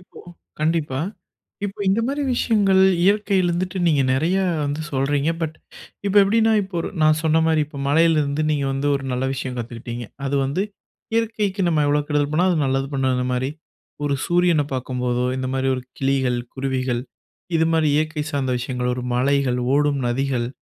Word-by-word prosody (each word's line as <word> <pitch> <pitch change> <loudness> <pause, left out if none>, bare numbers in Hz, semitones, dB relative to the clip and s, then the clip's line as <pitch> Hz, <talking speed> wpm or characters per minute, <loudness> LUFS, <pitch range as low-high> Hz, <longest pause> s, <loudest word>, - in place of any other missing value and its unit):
இப்போ 180 - -15 0.4
கண்டிப்பா. 155 -4 0 0.6
இப்போ 205 0 -5
இந்த 195 +4 +3
மாரி 285 +2 -1
விஷயங்கள் 200 -5 +3 0.2
இயற்கையில 200 -2 +2
இருந்துட்டு 185 +2 -2
நீங்க 150 -4 +3
நெறைய 160 +8 +1 0.3
வந்து 145 +2 -2
சொல்றீங்க. 140 +3 +1
பட் 155 -1 -3 0.5
இப்ப 200 - 0
எப்படின்னா 225 +3 +3
இப்ப 195 - -10
ஒரு - - -3
நான் 155 0 +4
சொன்ன 160 +1 +3
மாரி, 160 -1 +3
இப்ப 145 -1 -10
மழையிலிருந்து 155 -1 +3
நீங்க 145 -2 0
வந்து 135 +1 -2
ஒரு 135 - -7
நல்ல 125 +1 -1
விஷயம் 130 -1 -4
கத்துக்கிட்டீங்க. 120 0 -6 0.2
அது 140 +1 0
வந்து 140 +8 -1 0.5
இயற்கைக்கு 215 -4 0
நம்ம 155 -3 +2
எவ்வளோ 145 +1 +2
கெடுதல் 145 -1 +1
பண்ணாலும் 180 +3 +3
அது 150 - +1
நல்லது 135 0 0
பண்ணும் 130 -1 +1
அந்த 125 0 -1
மாரி. 130 +2 -1 0.5
ஒரு 145 -1 +1
சூரியன 175 -3 +3
பார்க்கும்போதோ 125 -1 -1
இந்த 130 0 -2
மாரி 135 0 0
ஒரு 125 - -5 0.2
கிளிகள், 135 -2 +1 0.2
குருவிகள் 130 -2 -1 0.5
இது 160 - +3
மாரி 160 -2 +3
இயற்கை 155 0 0
சார்ந்த 135 -3 0
விஷயங்களோ, 125 0 -2
ஒரு 125 - -4
மலைகள், 130 0 +1 0.2
ஓடும் 145 -1 +2
நதிகள், 125 -1 0
145 Hz, 165 wpm, -22 LUFS, 130-170 Hz, 0.6 s, நான்